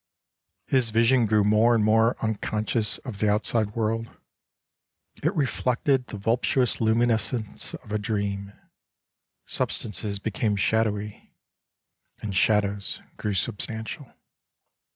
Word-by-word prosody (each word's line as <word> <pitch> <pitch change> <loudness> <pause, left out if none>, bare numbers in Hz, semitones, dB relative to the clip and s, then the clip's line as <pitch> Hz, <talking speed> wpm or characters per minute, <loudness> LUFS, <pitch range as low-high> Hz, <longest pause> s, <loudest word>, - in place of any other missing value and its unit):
His 130 -4 +1
vision 115 +2 +3
grew 105 -1 +3
more 110 +3 +4
and 110 - +2
more 115 +2 +3
unconscious 110 0 -1
of 115 -7 -6
the 105 - +2
out 105 +2 +1
side 110 -3 +1
world; 115 0 -1 1.1
it 160 +7 +1
reflected 130 -1 +1
the 105 - -7
voluptuous 120 +4 +1
luminousness 115 0 0
of 105 - -12
a 105 - 0
dream. 100 -1 -2 0.9
Substances 105 -1 -1
became 105 +1 -1
shadowy, 105 0 -1 0.8
and 100 -3 -5
shadows 100 0 +1
grew 105 - -3
r 100 - -1
substantial. 110 - -2
110 Hz, 110 wpm, -25 LUFS, 105-115 Hz, 1.1 s, more